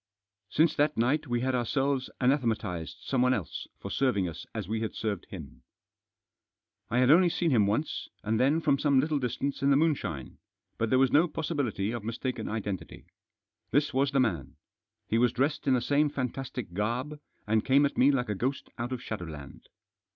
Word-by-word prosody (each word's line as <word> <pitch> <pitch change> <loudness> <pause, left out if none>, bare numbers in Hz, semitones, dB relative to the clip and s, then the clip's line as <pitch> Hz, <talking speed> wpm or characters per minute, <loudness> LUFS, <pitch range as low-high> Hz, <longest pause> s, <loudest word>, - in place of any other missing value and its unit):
Since 155 0 +3
that 145 +1 +2
night 145 +7 +1
we 120 -1 0
had 130 +1 0
ourselves 130 +2 0
anathematised 115 - 0
someone 130 -1 +2
else 95 - -5
for - - -7
serving 115 -9 +1
us 85 0 -8
as 110 -5 -5
we 110 +2 -2
had 110 - -3
served 105 -5 -3
him. - - -10 1.3
I 120 - 0
had 130 +2 +5
only 175 +3 +6
seen 170 -1 0
him 110 -6 +4
once, 110 +10 -2
and 110 +1 0
then 140 +6 +3
from 145 -3 +2
some 140 -3 +3
little 150 +1 +1
distance 130 +2 -2
in 140 - +3
the 140 - +5
moonshine, 130 - -1 0.4
but 115 - 0
there 130 - +4
was 130 -1 +4
no 160 +4 +5
possibility 130 - -2
of 120 -3 -5
mistaken 115 +1 -3
identity. 105 -4 -5 0.6
This 145 +3 +1
was 135 +2 +2
the 135 0 +1
man. 85 - -1 0.5
He 115 - +1
was 125 0 +4
dressed 140 +4 0
in 130 - +5
the 125 - +1
same 145 +4 +2
fantastic 130 -6 -4
garb, 120 +9 -2 0.3
and 110 +1 +2
came 140 +2 +4
at 140 - -2
me 130 - +5
like 125 -4 +1
a - - +1
ghost 130 +7 -3
out 120 +2 -3
of 130 -1 -4
shadowland. 80 - -7
125 Hz, 185 wpm, -29 LUFS, 110-140 Hz, 1.3 s, only